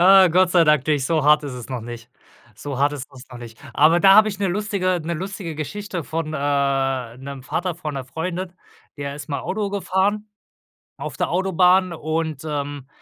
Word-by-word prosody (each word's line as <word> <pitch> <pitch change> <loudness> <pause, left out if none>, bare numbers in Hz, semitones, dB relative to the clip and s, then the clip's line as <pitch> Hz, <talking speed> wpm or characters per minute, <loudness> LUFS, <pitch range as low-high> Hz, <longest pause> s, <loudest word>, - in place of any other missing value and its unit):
Ah, 190 +1 +8
Gott 180 +2 +3
sei 175 -2 +5
Dank 150 -3 +3
nicht, 145 -3 +1
so 155 -2 +1
hart 150 0 +5
ist 140 - -5
es 125 -1 -8
noch 130 -2 -4
nicht. 120 +1 -9 0.4
So 140 +3 -6
hart 145 +1 +2
ist 140 -2 -6
es 130 0 -13
noch 125 - -9
nicht. 115 -2 -11 0.2
Aber 160 +4 +5
da 195 0 +7
habe 215 +1 +7
ich 200 -2 -5
'ne 195 -2 0
lustige 185 -2 -1
'ne 170 +1 -2
lustige 185 -1 -5
Geschichte 175 +3 -5
von, 160 0 -3
äh, 135 -4 0
'nem 135 0 -8
Vater 175 +6 -2
von 155 -4 -6
'ner 135 -1 -4
Freundin. 175 +6 -4 0.4
Der 140 -1 -5
ist 145 - -9
mal 140 - -2
Auto 205 0 -2
gefahren 200 +2 0 0.7
auf - - -6
der - - 0
Autobahn 185 0 +3
und, 160 -2 -3
ähm, 145 -2 -4
155 Hz, 200 wpm, -22 LUFS, 140-185 Hz, 0.7 s, Ah